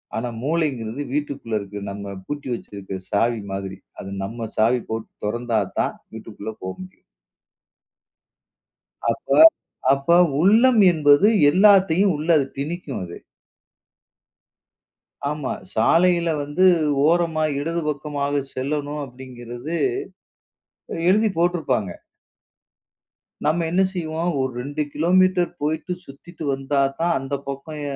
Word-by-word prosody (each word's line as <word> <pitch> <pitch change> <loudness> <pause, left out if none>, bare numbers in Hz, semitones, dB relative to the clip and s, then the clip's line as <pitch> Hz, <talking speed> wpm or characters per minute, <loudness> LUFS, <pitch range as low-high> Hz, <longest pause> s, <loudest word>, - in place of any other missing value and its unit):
ஆனா 120 +2 -2
மூளைங்கிறது 140 -5 -1
வீட்டுக்குள்ள 140 -6 -2
இருக்கு 100 0 -7
நம்ம 100 0 -6
பூட்டி 145 -1 -5
வச்சிருக்கிற 100 -4 -7
சாவி 115 +2 +1
மாதிரி. 95 0 -5 0.2
அது 95 - -7
நம்ம 115 +3 -5
சாவி 120 +3 +3
போட்டுத் 110 0 -6
தொறந்தா 115 +1 0 0.2
தான் - - 0 0.2
வீட்டுக்குள்ள 110 -1 -8
போக 95 0 -4
முடியும். 185 0 -12 2.1
அப்போ - - -1 0.6
அப்போ 140 +5 +2 0.3
உள்ளம் 225 +6 +5
என்பது 150 +3 +5 0.2
எல்லாத்தையும் 195 0 +5
உள்ள 150 +2 -5
அது 140 - +1
திணிக்கும் 150 - -4
அது. 85 -1 -8 2.1
ஆமா, 150 -2 -3 0.2
சாலையில 170 +8 +3
வந்து 145 +6 +1 0.4
ஓரமா 165 -1 +2 0.2
இடது 165 +3 -2
பக்கமாகச் 145 -1 -2
செல்லணும் 145 +2 -3
அப்டிங்கிறது 125 +3 -7 1.3
எழுதிப் 210 -1 +2
போட்டுருப்பாங்க. 155 - 0 1.5
நம்ம 165 +2 +2
என்ன 185 +2 +3
செய்வோம், 165 -1 -2
ஒரு 130 0 -1
2 145 +4 -3
கிலோமீட்டர் 180 +2 +3
போயிட்டு 160 +4 -2
சுத்திட்டு 160 +5 -11
வந்தா 135 +1 -1 0.2
தான் 170 +1 +2
அந்தப் 135 +1 -5
பக்கம் 150 +3 -6
145 Hz, 105 wpm, -22 LUFS, 120-170 Hz, 2.1 s, உள்ளம்